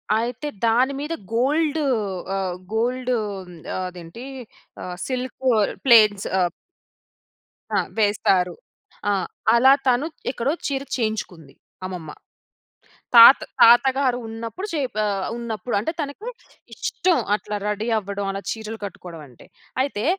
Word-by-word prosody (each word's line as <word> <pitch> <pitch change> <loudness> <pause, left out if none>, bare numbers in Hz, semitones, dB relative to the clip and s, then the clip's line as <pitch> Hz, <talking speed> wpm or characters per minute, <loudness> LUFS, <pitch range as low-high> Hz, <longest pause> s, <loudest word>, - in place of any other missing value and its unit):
అయితే, 235 +6 -2 0.2
దాని 250 +5 +3
మీద 300 +3 -3 0.2
గోల్డూ 295 +6 +1 0.5
ఆహ్, 190 -2 -2 0.2
గోల్డూ 250 +3 0 0.3
హ్మ్, 175 -1 -12 0.2
అదేంటీ, 180 +4 -7 0.6
ఆహ్, 180 - -5
సిల్కూ 260 0 -2 0.4
ప్లేట్స్ 215 -5 +6
ఆహ్ 180 -1 +2 1.3
ఆ! - - +3 0.2
వేస్తారు. 195 -3 +2 0.6
ఆ! - - +3 0.4
అలా 260 +3 +7
తను 255 +3 +3 0.3
ఎక్కడో 265 +2 -1 0.2
చీర 275 -2 -2 0.2
చేయించుకుంది, 195 - -4 0.3
అమ్మమ్మ. 180 -4 -6 1.1
తాత 235 +3 +11 0.2
తాతగారు 255 +2 +5
ఉన్నప్పుడు 230 - -6
చేప్ 275 -8 -2
ఆహ్, 195 -2 -1
ఉన్నప్పుడు 235 0 -4
అంటే, 230 +11 -2
తనకి 300 - -5 0.4
ఇష్టం 360 -2 0 0.2
అట్లా 210 0 -3
రెడీ 210 +2 -2
అవ్వడం, 200 0 -4
అలా 195 0 -4
చీరలు 220 0 -5
కట్టుకోడవంటే. 165 - -10 0.4
అయితే, 250 -6 -3
230 Hz, 110 wpm, -23 LUFS, 195-260 Hz, 1.3 s, తాత